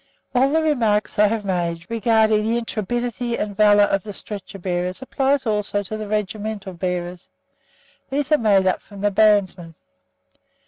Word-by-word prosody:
All 260 +2 +3
the 320 +2 +1
remarks 225 -10 +1
I 210 - +6
have 215 0 -2
made 170 -3 -2
regarding 220 -1 +2
the 225 +2 0
intrepidity 235 +1 -3
and 205 -1 -3
valour 205 0 +5
of 195 -1 +1
the 205 +1 -8
stretcher 195 0 -8
bearers 180 +3 -3
apply 270 +1 +1
also 210 -2 -1
to 210 +2 -5
the 215 -1 -5
regimental 210 -1 -3
bearers. 180 0 -4 0.8
These 285 +2 -2
are 305 - +5
made 200 -4 +3
up 185 - +1
from 200 -2 -12
the 205 0 +1
bandsmen. 190 -5 +2
210 Hz, 155 wpm, -21 LUFS, 190-230 Hz, 0.8 s, I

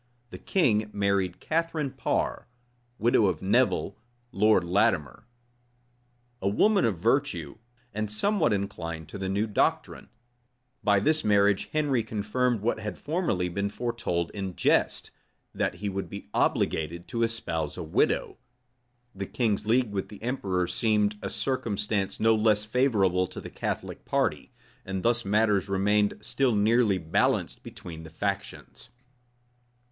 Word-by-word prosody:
The - - -8
king 110 - +1
married 100 -3 0
Catharine 160 -3 -1
Par, - - -2 0.5
widow 115 -2 +3
of 90 -3 -2
Nevil, 105 -1 +1 0.3
Lord 105 -3 +4
Latimer; 90 +1 0 1.1
a 100 - +1
woman 205 - +3
of 105 -6 0
virtue, 95 - 0 0.3
and 110 0 -2
somewhat 165 - +1
inclined 85 -5 -3
to 100 - -7
the 95 -1 -2
new 100 +3 +1
doctrine. 105 - -1 0.7
By 100 -1 +4
this 155 +8 +2
marriage 100 -1 +3
Henry 145 -5 +1
confirmed 110 +2 -1
what 110 +1 0
had 105 -4 -5
formerly 150 - -1
been 100 +3 -2
foretold 110 -7 -2
in 95 -3 -5
jest, - - +1 0.4
that - - -1
he 105 - -5
would 95 -1 -3
be 100 - -9
obliged 85 +2 0
to 115 -2 -2
espouse 85 -10 -1
a - - -4
widow. - - 0 0.7
The 100 0 -5
king's 110 -4 -1
league 120 -1 +2
with 100 -2 -3
the 105 0 -12
emperor 95 -8 -1
seemed 105 +1 +1
a - - -3
circumstance 105 -6 -2
no 115 +1 +4
less 105 -1 +2
favorable 105 -7 +2
to - - -9
the - - -9
Catholic - - -4
party; - - -1 0.3
and 95 -1 -4
thus 120 0 +2
matters 105 -1 +2
remained 105 +2 +2
still 125 +2 +1
nearly 105 -1 +3
balanced 80 -2 0
between 80 -2 -9
the 80 - -10
factions. 100 +4 -5
105 Hz, 135 wpm, -27 LUFS, 95-115 Hz, 1.1 s, Lord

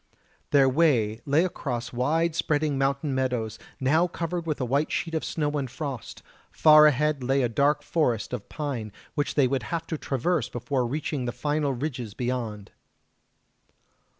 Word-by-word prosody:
Their 140 -2 +5
way 125 -7 +2
lay 150 +5 +4
across 125 -8 -4
wide 160 +7 +1
spreading 150 -2 0
mountain 135 +1 0
meadows, 125 -5 -1 0.2
now 155 +7 +3
covered 170 0 -4
with 155 - -1
a 130 - 0
white 140 +5 0
sheet 165 - -2
of 160 - -1
snow 150 -2 -1
and 135 -2 -3
frost; 130 -2 -6 0.3
far 155 -1 +7
ahead 150 -1 +1
lay 135 +1 +2
a - - +3
dark 140 +5 +1
forest 125 -9 0
of 115 -5 -5
pine 135 -8 -4 0.2
which 145 - -1
they 140 -3 +4
would 135 0 0
have 165 -1 -2
to 160 -3 -4
traverse 135 0 0
before 125 +1 -1
reaching 145 0 -2
the 120 - -1
final 145 +1 -1
ridges 125 -5 -4
beyond. 120 -5 -3
140 Hz, 160 wpm, -26 LUFS, 125-155 Hz, 0.3 s, far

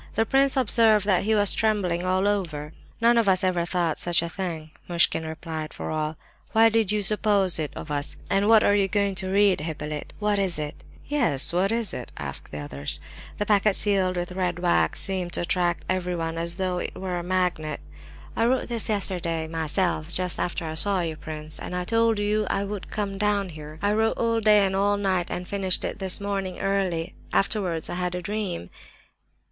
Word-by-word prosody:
The 225 - +2
prince 270 +2 +3
observed 220 -4 +4
that 195 -1 +2
he 220 +1 +2
was 205 -1 +4
trembling 200 -6 +1
all 185 +2 +2
over. 160 -7 -2 0.3
"None 235 0 +5
of 220 -4 +3
us 185 0 +3
ever 180 -2 +1
thought 175 -3 -1
such 175 -1 +2
a 170 - -3
thing!" 165 -4 -5 0.2
Muishkin 170 -1 +3
replied 160 -1 -6
for - - -5
all. 155 0 -2 0.4
"Why 225 +1 +6
should 225 -3 +2
you 210 -1 +1
suppose 200 -3 +2
it 150 -2 -2
of 150 - -7
us? 145 -1 -1
And 195 +1 +2
what 220 -1 +6
are 205 - +4
you 200 -1 +3
going 200 0 +1
to 185 0 -4
read, 200 -3 +4
Hippolyte? 150 -1 -5
What 210 -1 0
is 190 -4 0
it?" 150 -1 -5 0.2
"Yes, 230 - +1
what 190 +3 +2
is 225 -6 -1
it?" - - -6
asked - - -4
others. 70 -1 -4 0.4
The 210 - -1
packet 210 -1 +3
sealed 190 -3 +2
with 175 0 -3
red 180 -2 -1
wax 175 -1 +2
seemed 185 -3 0
to - - 0
attract 175 0 0
everyone, 175 -3 -2
as 170 +1 -2
though 185 -2 -1
it - - -5
were 185 -1 -3
a - - -5
magnet. 180 -4 -1 0.6
"I 230 - +2
wrote 255 0 0
this 230 -2 -1
yesterday, 175 -6 -1
myself, 160 +1 -1
just 180 0 -2
after 175 -1 -2
I 155 - -4
saw 190 +3 +4
you, 165 -2 -3
prince, 155 0 -5
and 180 0 -4
told 230 -1 +2
you 210 0 0
I 195 - 0
would 200 -1 -6
come 200 -2 -3
down 205 -2 +1
here. 155 -1 -9
I 205 +1 +2
wrote 220 +1 +1
all 230 -1 +1
day 210 -2 +5
and 190 0 -1
all 205 +1 +2
night, 190 -3 0
and 180 0 -4
finished 195 -2 0
it - - -4
this 190 -2 +1
morning 195 -2 -3
early. 190 -4 -1 0.2
Afterwards 185 -5 +1
I - - -5
had 180 0 -2
a 180 - -3
dream." 200 - -4
185 Hz, 200 wpm, -25 LUFS, 170-205 Hz, 0.6 s, Why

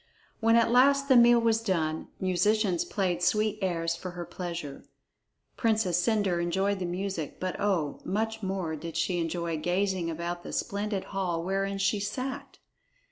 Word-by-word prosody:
When 225 0 +4
at 230 0 +4
last 275 +3 +5
the 260 - +7
meal 240 0 +7
was 225 -1 +2
done, 160 -7 -1
musicians 185 0 +2
played 180 -4 -1
sweet 215 +2 +1
airs 170 -3 0
for 180 +2 -6
her 175 - -4
pleasure. 170 -7 -6 0.7
Princess 215 -7 +2
Cendre 200 -5 +1
enjoyed 190 +3 0
the 180 - -2
music, 180 -3 -4
but 185 0 -2
oh, 185 -8 0
much 220 +3 -2
more 190 -5 -2
did 165 +1 -6
she 180 -2 0
enjoy 170 0 -2
gazing 180 +1 0
about 170 +2 -4
the - - -8
splendid 200 -1 -2
hall 180 -4 -1
wherein 195 +2 -1
she 195 +2 +1
sat! 255 +6 -4
190 Hz, 155 wpm, -28 LUFS, 175-215 Hz, 0.7 s, the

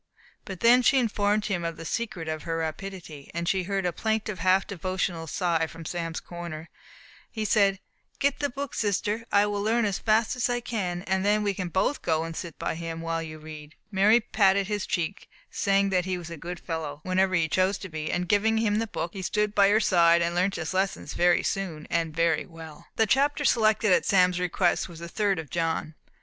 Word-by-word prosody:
But 190 -2 -8
when 245 +2 +7
she 270 +2 +4
informed 210 -3 +1
him 190 -5 -1
of 165 -1 -3
the 165 - -8
secret 185 -6 -3
of 155 -1 -3
her 165 -1 -3
rapidity, 165 -2 -6
and 170 0 -2
he 190 +1 +2
heard 195 +1 -2
a 175 - 0
plaintive, 220 -2 -2
half 185 +1 +3
devotional 185 -3 -3
sigh 165 -1 0
from 165 0 -11
Sam's 165 -1 -3
corner, 170 -2 -8 0.6
he 220 -1 -4
said, 200 -2 +3 0.4
"Get 280 0 +1
the 285 - 0
book, 275 +1 -5
sister; 210 +2 -1
I 200 0 +5
will 205 -1 -2
learn 225 +2 +2
as 200 -2 -1
fast 220 +1 +2
as 250 0 0
I 245 0 0
can, 185 -7 -3
and 190 0 0
then 210 +1 +2
we 200 -1 0
can 185 -1 -4
both 190 - 0
go 160 -1 0
and 165 0 -6
sit 170 -2 -6
by - - -2
him, 165 0 -5
while 165 0 -2
you 155 -1 -7
read." 155 0 -11 0.2
Mary 205 +4 +5
patted 200 -4 +2
his 205 0 -3
cheek, 175 +3 -3 0.2
saying 195 0 +2
that 180 -2 +1
he 185 -1 -1
was 170 -1 -8
a - - -5
good 175 +3 -7
fellow, 155 -3 -5
whenever 185 0 +1
he 170 -2 +2
chose 185 +4 +1
to 190 - -8
be; 155 -2 -4
and 180 0 -1
giving 215 +4 +2
him 215 -1 +1
the 225 - -1
book, 175 -4 -4
he 195 - -6
stood 210 +3 0
by 200 -1 +5
her 210 +2 +4
side, 170 -4 +4
and 170 0 -1
learnt 185 +3 +1
his 160 - -4
lessons 190 +1 -1
very 175 0 +3
soon, 170 -6 -3
and 165 -2 0
very 165 0 +1
well. 165 -1 -12
The 225 - +3
chapter 285 +5 +2
selected 220 -4 +3
at - - +2
Sam's 180 -2 +4
request 180 +1 +1
was 170 - -11
the 170 +1 -7
third 200 +1 0
of 160 -4 -7
John. 165 -2 -1
185 Hz, 215 wpm, -27 LUFS, 165-210 Hz, 0.6 s, when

